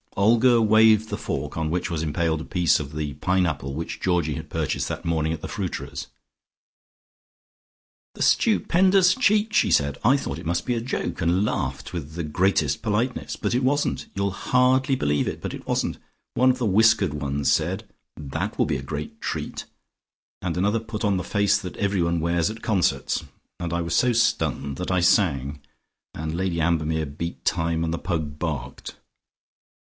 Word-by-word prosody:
'" - - -26
Olga 115 +4 +5
waved 110 0 +5
the - - -3
fork 70 +1 -4
on 80 -1 -1
which 90 +2 -1
was 80 -2 -2
impaled 80 +1 0
a - - -7
piece 90 -2 +2
of 75 -1 -6
the 75 -2 -3
pineapple 80 -3 0
which 80 +4 -5
Georgie 85 -5 +1
had - - -7
purchased - - -2
that - - -5
morning 80 -1 0
at 80 - -4
the - - -5
fruiterer's. - - -5 2.1
"The - - -9
stupendous 190 -3 +4
cheek!" 215 -3 +2
she - - +3
said. 70 -1 +2
"I 130 +5 +5
thought 70 - -4
it - - -10
must 85 +2 -1
be 125 - 0
a 115 - -2
joke, 120 -5 -3
and 90 +4 +2
laughed - - -3
with 80 -3 -5
the 85 - -3
greatest 75 -2 +1
politeness. 115 +3 -1
But - - -2
it 125 - +1
wasn't! 145 +3 0
You'll 100 0 0
hardly 130 +5 +2
believe 75 - 0
it, - - -4
but - - -4
it - - -8
wasn't! - - -1 0.4
One 130 +1 +4
of 130 - +2
the 125 - -1
whiskered 110 -3 +4
ones 70 -1 -1
said, - - 0 0.3
That 70 -3 -4
will - - +3
be - - -1
a - - -6
great 75 0 -6
treat,' - - -4 0.8
and 90 -1 -2
another 105 +5 +1
put 110 0 -5
on 100 -2 +2
the 90 - -2
face 100 +3 +2
that 90 -4 -8
everyone 90 -4 0
wears 85 +2 +1
at 110 +1 -8
concerts. 100 -6 0 0.4
And 85 -1 -3
I 85 0 0
was 85 -1 -2
so 125 - +3
stunned 70 - 0
that 90 - -3
I 95 - +2
sang, 75 -6 +2 0.5
and 80 +1 -4
Lady 90 -1 -1
Ambermere 80 -1 +1
beat 75 +4 -6
time, 80 -1 0
and 85 0 -3
Pug 80 -4 -2
barked." 70 -6 -5
85 Hz, 180 wpm, -24 LUFS, 80-110 Hz, 2.1 s, Olga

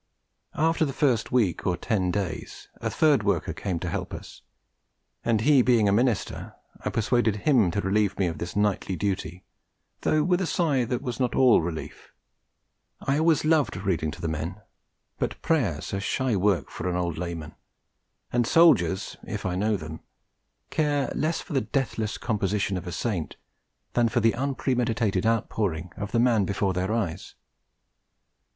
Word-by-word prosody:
After 160 +1 +2
the 140 -3 -1
first 130 -6 +2
week 110 -9 +1
or 90 -2 +1
ten 95 -4 0
days, 90 -3 -4
a - - -3
third 150 -6 +3
worker 100 -6 0
came 90 -3 -3
to 90 - -3
help 85 - -3
us; - - -11 0.8
and 115 -2 +2
he 140 +2 +5
being 120 -4 +4
a - - +4
minister, 115 +1 0 0.3
I - - -1
persuaded 115 -1 +1
him 125 - +4
to 100 +4 -1
relieve 100 0 +1
me 95 - +2
of 80 -2 -3
this 85 +2 -5
nightly 105 -2 0
duty, 90 -2 -3 0.6
though 155 -1 +2
with 180 +3 +2
a 185 - 0
sigh 145 -9 +1
that 125 +2 -3
was 125 -4 -4
not 125 -2 0
all 125 -7 +6
relief. 80 -1 -6 0.9
I 140 +2 0
always 160 -1 +3
loved 155 - +2
reading 90 -5 -1
to 85 - -8
the 85 - -2
men, 80 +5 -4 0.6
but - - -2
Prayers 105 - 0
are 100 - 0
shy 125 +3 0
work 100 -1 +1
for 90 - -3
an 90 - -1
old 85 -3 -2
layman, 85 -2 -5 0.8
and 120 -1 +2
soldiers 100 - +4
(if - - -5
I 90 - 0
know 105 +3 +1
them) 80 -2 -8 0.7
care 145 -3 +1
less 160 +2 -1
for - - -8
the 135 - +2
deathless 115 -6 -2
composition 105 -3 -1
of 90 0 -5
a - - -4
Saint 90 -2 -3 0.6
than 120 -1 +3
for 120 +2 +1
the 115 0 +3
unpremeditated 120 -6 0
outpouring 100 -7 -1
of 105 -2 -5
the 115 - +2
man 115 -4 +4
before 100 -1 0
their 95 +3 -1
eyes. 105 -8 -3
105 Hz, 170 wpm, -26 LUFS, 90-125 Hz, 0.9 s, all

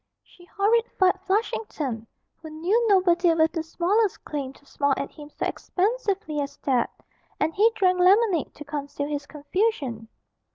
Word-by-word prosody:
She 350 - -19
horrified 400 -1 +2
Flushington, 310 - -2 0.3
who 320 - -8
knew 370 +10 +1
nobody 355 -4 +4
with 320 0 +3
the 330 - -2
smallest 370 +6 0
claim 280 -3 -4
to 285 - -22
smile 280 0 0
at 280 - -4
him 295 -1 -12
so - - -4
expansively 400 -6 -1
as 280 - -5
that, 255 -4 +1 0.5
and 320 - 0
he 425 +6 +5
drank 365 -2 +2
lemonade 375 -2 +3
to 295 - -10
conceal 285 -1 -4
his 290 -1 -4
confusion. 295 - -2
340 Hz, 150 wpm, -25 LUFS, 290-400 Hz, 0.5 s, he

